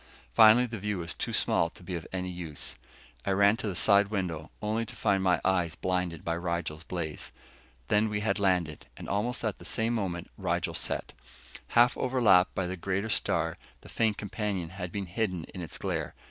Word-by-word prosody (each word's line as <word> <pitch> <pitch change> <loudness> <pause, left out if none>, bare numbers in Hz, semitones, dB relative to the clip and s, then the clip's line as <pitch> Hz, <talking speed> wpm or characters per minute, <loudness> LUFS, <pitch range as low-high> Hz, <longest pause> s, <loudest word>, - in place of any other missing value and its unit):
Finally 115 +2 +8
the 115 -3 -5
view 105 0 -2
was 85 -2 -3
too - - -3
small 85 - +2
to 90 - -15
be 90 - -6
of 85 -3 -4
any 90 -1 -2
use. 85 -5 -5 0.5
I - - -2
ran 100 +2 +5
to 110 - -3
the 95 - -2
side 100 +2 +5
window, 90 -7 -3
only 110 +2 -1
to 115 - -8
find 100 -3 +2
my 90 -1 +3
eyes 90 -4 +2
blinded 90 -3 -1
by 85 0 0
Rigel's 85 -3 -3
blaze. 80 -4 -4 0.6
Then 105 +4 +3
we 105 0 -1
had 100 -2 +1
landed, 90 -6 +1
and - - -8
almost 115 +6 -1
at 110 - -2
the - - -11
same 115 +1 0
moment 90 -6 -3
Rigel - - -1
set. - - -2 0.6
Half 120 +1 +6
overlapped 110 -8 +4
by 95 - 0
the 90 +1 -3
greater 100 +4 -1
star, - - 0 0.2
the - - -14
faint 110 -3 +1
companion 100 -4 -3
had 90 -1 -6
been 100 +1 -3
hidden 90 -2 -2
in 90 - -6
its 85 - -6
glare. - - -3
95 Hz, 195 wpm, -29 LUFS, 85-105 Hz, 0.6 s, Finally